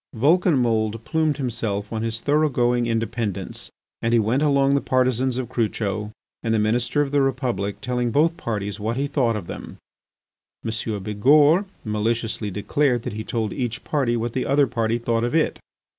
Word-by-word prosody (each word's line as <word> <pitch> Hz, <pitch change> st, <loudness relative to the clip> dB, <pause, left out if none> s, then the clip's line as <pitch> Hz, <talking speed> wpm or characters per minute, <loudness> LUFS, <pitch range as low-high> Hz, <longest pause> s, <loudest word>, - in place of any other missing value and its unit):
Vulcanmould 120 Hz, -, +2 dB
plumed 155 Hz, +1 st, 0 dB
himself 110 Hz, -6 st, -3 dB
on 110 Hz, -, -2 dB
his 115 Hz, 0 st, -2 dB
thoroughgoing 125 Hz, -5 st, +2 dB
independence 115 Hz, -3 st, -3 dB, 0.3 s
and 115 Hz, +1 st, 0 dB
he 120 Hz, -, +5 dB
went 115 Hz, +6 st, +1 dB
among 140 Hz, -2 st, +3 dB
the 140 Hz, -, +2 dB
partisans 130 Hz, 0 st, +1 dB
of 130 Hz, -2 st, -2 dB
Crucho 105 Hz, -3 st, -2 dB, 0.3 s
and 115 Hz, -1 st, 0 dB
the -, -, +3 dB
Minister 120 Hz, +6 st, +1 dB
of 140 Hz, -, -5 dB
the 145 Hz, -1 st, +3 dB
Republic 125 Hz, -7 st, -1 dB
telling 125 Hz, -1 st, -1 dB
both 160 Hz, +7 st, +2 dB
parties 105 Hz, -, -4 dB
what 110 Hz, +3 st, -2 dB
he 140 Hz, -, 0 dB
thought 125 Hz, -5 st, +1 dB
of 105 Hz, -5 st, -4 dB
them. -, -, -8 dB, 0.9 s
M. 110 Hz, -, -1 dB, 0.3 s
Bigourd 145 Hz, -, +4 dB, 0.2 s
maliciously 110 Hz, 0 st, -1 dB
declared 120 Hz, +5 st, 0 dB
that -, -, -4 dB
he 110 Hz, +1 st, -4 dB
told 110 Hz, -2 st, -2 dB
each 120 Hz, -1 st, -3 dB
party 130 Hz, -6 st, 0 dB
what 115 Hz, 0 st, -3 dB
the 130 Hz, -, -1 dB
other 140 Hz, +1 st, +4 dB
party 115 Hz, -2 st, 0 dB
thought 115 Hz, -1 st, 0 dB
of 120 Hz, +5 st, -1 dB
it. 160 Hz, -, +1 dB
120 Hz, 170 wpm, -23 LUFS, 110-135 Hz, 0.9 s, he